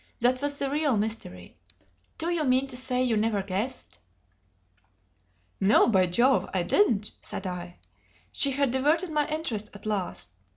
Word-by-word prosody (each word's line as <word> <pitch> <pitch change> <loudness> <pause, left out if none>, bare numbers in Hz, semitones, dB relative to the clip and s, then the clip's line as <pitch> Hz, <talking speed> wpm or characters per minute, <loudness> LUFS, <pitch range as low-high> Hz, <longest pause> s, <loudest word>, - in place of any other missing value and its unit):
That 250 +2 +2
was 285 0 -1
the 280 - 0
real 285 -3 +1
mystery. 205 - -3 0.6
Do 335 +2 0
you 335 -3 0
mean 260 -1 +3
to 265 -2 -5
say 250 0 0
you 240 -3 +1
never 210 -2 0
guessed?" 205 +7 -4 1.6
"No, 195 +3 +5
by 190 -4 +3
Jove 240 +9 +2
I 180 - +1
didn't!" 215 - +2
said 195 - -6
I. 180 -1 -6 0.5
She 280 - +1
had 275 -1 +1
diverted 305 +7 +1
my 300 -1 +1
interest 280 -10 -3
at 205 - -11
last. 200 - -3
245 Hz, 155 wpm, -27 LUFS, 205-280 Hz, 1.6 s, No